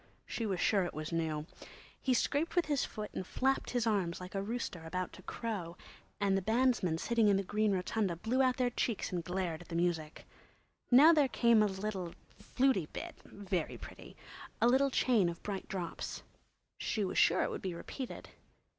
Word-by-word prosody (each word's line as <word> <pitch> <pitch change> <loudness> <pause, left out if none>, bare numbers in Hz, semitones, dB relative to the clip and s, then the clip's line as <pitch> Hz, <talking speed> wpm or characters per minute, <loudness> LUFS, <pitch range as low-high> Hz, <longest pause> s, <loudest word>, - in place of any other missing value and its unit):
She 230 - -3
was 190 -3 -1
sure 200 -3 +3
it 175 - -4
was 155 +1 -4
new. 160 -2 -1 0.6
He 255 -2 +2
scraped 290 +6 0
with 350 - +3
his 290 -3 +1
foot 210 -1 -5
and - - -3
flapped 265 +8 0
his 245 -2 0
arms 195 -6 0
like 180 0 -8
a 195 - -1
rooster 205 -5 -4
about 180 +2 -3
to - - -11
crow, 190 -7 -4 0.4
and 200 -1 +2
the 195 - +1
bandsmen 220 -5 +2
sitting 230 +4 +2
in 200 -1 +5
the 195 - 0
green 210 +2 +1
rotunda 190 0 0
blew 230 +10 0
out 255 -1 +3
their 250 -1 +1
cheeks 235 -2 -1
and 175 -2 -2
glared 180 -2 -2
at 175 - -13
the 165 - -6
music. 165 -3 -1 0.6
Now 290 +7 +8
there 295 -4 +4
came 235 -3 +4
a 210 - +4
little 190 -3 -4 0.2
"flutey" 255 - +1
bit—very 190 -5 -4
pretty!—a 235 - -5
little 265 +3 +4
chain 235 -8 +3
of 170 0 -8
bright 200 -2 -4
drops. 180 -4 -4 0.6
She 210 -3 -1
was - - 0
sure 175 - +4
it - - -1
would - - -5
be 185 -3 -3
repeated. 255 +8 -7
200 Hz, 185 wpm, -33 LUFS, 175-240 Hz, 0.6 s, Now